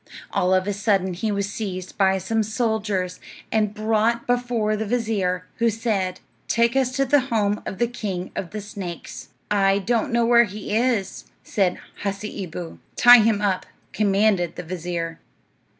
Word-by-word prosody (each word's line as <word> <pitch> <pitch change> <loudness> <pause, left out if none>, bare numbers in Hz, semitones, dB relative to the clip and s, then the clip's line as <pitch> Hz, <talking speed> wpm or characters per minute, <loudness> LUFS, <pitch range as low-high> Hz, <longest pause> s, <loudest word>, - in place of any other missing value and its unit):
All 180 - +1
of 185 0 +1
a 205 - 0
sudden 195 -2 +1
he 210 +5 -2
was 200 -1 -1
seized 185 -4 -5
by 190 -1 +3
some 220 +4 0
soldiers, 215 -4 -1 0.3
and 215 -2 +2
brought 220 +2 +1
before 245 -3 0
the 215 - -2
vizir, 200 -6 0
who 230 0 +3
said, 210 -5 -1 0.3
"Take 235 +2 +2
us 265 -2 +2
to 275 0 +1
the 285 +2 +4
home 210 -2 +1
of 190 - -5
the 240 - +2
king 200 -6 -4
of 180 - -4
the 210 +3 -5
snakes." 195 -4 -7 0.2
"I 195 -1 +3
don't 230 +6 0
know 235 0 +2
where 235 0 +6
it 210 -5 -1
is," 215 -1 -1 0.2
said 190 -4 0 0.2
Hasseeboo. 195 -4 -5 0.2
"Tie 245 0 +9
him 215 -1 +2
up," 190 -3 0 0.3
commanded 200 -4 +2
the - - -6
vizir. 170 -1 -4
210 Hz, 160 wpm, -23 LUFS, 190-230 Hz, 0.3 s, Tie